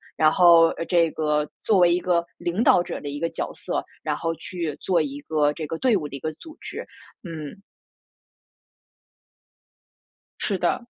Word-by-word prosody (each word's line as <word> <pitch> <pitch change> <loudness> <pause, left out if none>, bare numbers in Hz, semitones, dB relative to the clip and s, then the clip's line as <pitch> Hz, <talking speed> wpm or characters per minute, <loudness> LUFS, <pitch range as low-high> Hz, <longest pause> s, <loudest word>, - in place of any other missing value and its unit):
然 155 0 +4
后， 170 -2 +7
呃， - - -4
这 170 -2 +3
个 150 -1 0 0.2
作 210 -3 +3
为 175 -1 +5
一 180 - +2
个 175 -2 +1
领 180 +7 -1
导 175 - +6
者 - - -5
的 145 - -6
一 145 - -5
个 165 - -1
角 - - -4
色， - - -3 0.2
然 - - -1
后 165 0 -1
去 170 -5 -5
做 180 -3 +2
一 145 -2 -3
个 150 -1 +1
这 155 -1 -5
个 165 - -4
队 245 0 +3
伍 155 -6 -1
的 140 - -8
一 - - -6
个 155 +4 -3
组 315 - -13
织， - - -7 0.4
嗯。 165 +1 -8 2.8
是 200 - -1
的。 185 +7 -1
165 Hz, 190 characters per minute, -24 LUFS, 150-180 Hz, 2.8 s, 后